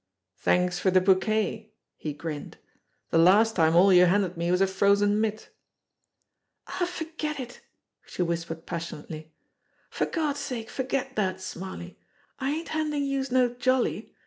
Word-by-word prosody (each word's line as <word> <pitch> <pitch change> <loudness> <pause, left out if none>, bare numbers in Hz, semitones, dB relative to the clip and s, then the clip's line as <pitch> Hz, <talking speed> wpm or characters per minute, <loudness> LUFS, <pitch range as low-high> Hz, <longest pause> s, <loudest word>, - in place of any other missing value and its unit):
"Thanks 180 0 +1
for 190 - +2
the 185 0 +5
bouquet!" 215 +3 +1 0.2
he 155 - -5
grinned. 150 0 -7 0.5
"The 165 - +4
last 210 +6 +5
time 160 -1 +3
all 190 +3 +6
you 180 0 +7
handed 185 -1 +1
me 170 +1 -2
was 180 +1 +2
a 195 - +5
frozen 200 +2 +2
mitt." 215 -1 -3 1.2
"Aw, 355 - -2
forget 320 -3 -5
it 245 -2 -8 0.2
!" - - -43
she 180 - -2
whispered 165 -1 -4
passionately. 160 -2 -7 0.6
"For - - -1
Gawd's 300 -4 -1
sake 250 -5 -5
forget 265 0 -2
dat, 190 -3 -1
Smarly. 185 -1 -8 0.4
I 265 0 -1
ain't 320 +3 -3
handin' 305 -2 -1
youse 275 -1 -2
no 250 -1 +2
jolly. 255 +1 0
205 Hz, 150 wpm, -27 LUFS, 180-260 Hz, 1.2 s, you